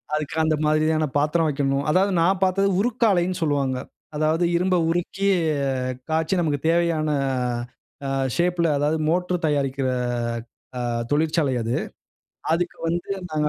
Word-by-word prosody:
அதுக்கு 155 0 -3
அந்த 155 0 +2
மாதிரியான 155 +1 +2
பாத்திரம் 155 +3 +2
வைக்கணும். 140 -1 0
அதாவது, 190 +5 +3
நான் 185 +3 +2
பாத்தது 195 +1 +2
உருக்காலைன்னு 200 -6 +1
சொல்லுவாங்க. 140 -4 0 0.4
அதாவது, 155 +3 +1
இரும்ப 180 +2 +2
உருக்கி 175 +3 -1 0.8
காய்ச்சி 160 +3 +1
நமக்கு 150 -4 0
தேவையான 165 -2 +1 1.0
அ - - -2 0.3
ஷேப்ல, 175 -1 +1
அதாவது 150 +2 +1
மோட்ரு 180 +1 +1
தயாரிக்கிற 140 -3 0 0.9
அ 125 - -2 0.3
தொழிற்சாலை 155 -1 +1
அது. 115 +1 -2 0.8
அதுக்கு 170 +1 -1
வந்து 175 +3 -2 0.2
நாங்க 150 -1 +1
160 Hz, 120 wpm, -23 LUFS, 150-175 Hz, 1.0 s, அதாவது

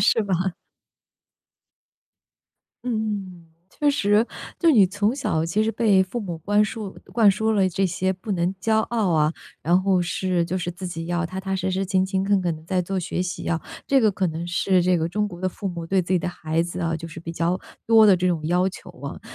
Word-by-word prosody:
是 225 - +4
吧？ 190 -2 -1 2.3
嗯， 205 -7 -3 0.2
确 290 +6 +1
实， 210 -4 +3 0.3
就 335 -2 +4
是 - - +5
你 200 -4 +7
从 205 +5 0
小 165 - -1
其 185 +6 +1
实 220 - +1
被 205 -4 +3
父 190 +6 -4
母 180 -7 -5
观 205 +5 +2
树 210 -2 -6 0.2
灌 220 -4 +6
输 220 +3 0
了 195 -3 +3
这 190 +2 0
些 185 +1 0
不 195 +3 -4
能 180 +1 0
骄 220 +3 +1
傲 220 -4 0
啊， 155 0 +2 0.3
然 175 +3 +3
后 190 -2 +3
是 175 0 0
就 185 - -2
是 175 -1 -2
自 180 +1 -6
己 165 -1 -5
要 175 0 -1
踏 185 +2 -6
踏 190 0 -3
实 190 0 -1
实、 190 +1 0
勤 190 0 +1
勤 190 0 -1
恳 200 -1 +3
恳 170 -3 -1
地 155 - -14
在 180 +2 0
做 190 +2 -2
学 180 0 -3
习 185 +1 -5
啊， 165 -2 0 0.3
这 275 -1 +4
个 220 -3 +4
可 190 -1 -1
能 165 +2 -4
是 180 +1 +2
这 180 0 +3
个 165 0 -1
中 210 +2 0
国 175 -1 -10
的 - - +1
父 195 +2 -5
母 170 -2 -5
对 190 +2 +2
自 185 +1 -1
己 - - +4
的 - - -4
孩 165 -2 -1
子 175 +1 -5
啊， 165 -1 0
就 165 +1 -7
是 165 +1 -9
比 165 - -6
较 170 +2 0 0.3
多 220 -1 +7
的 195 - +6
这 180 +1 0
种 160 -4 0
要 180 +2 +2
求 - - -11
啊。 - - -6
185 Hz, 245 characters per minute, -23 LUFS, 175-205 Hz, 2.3 s, 你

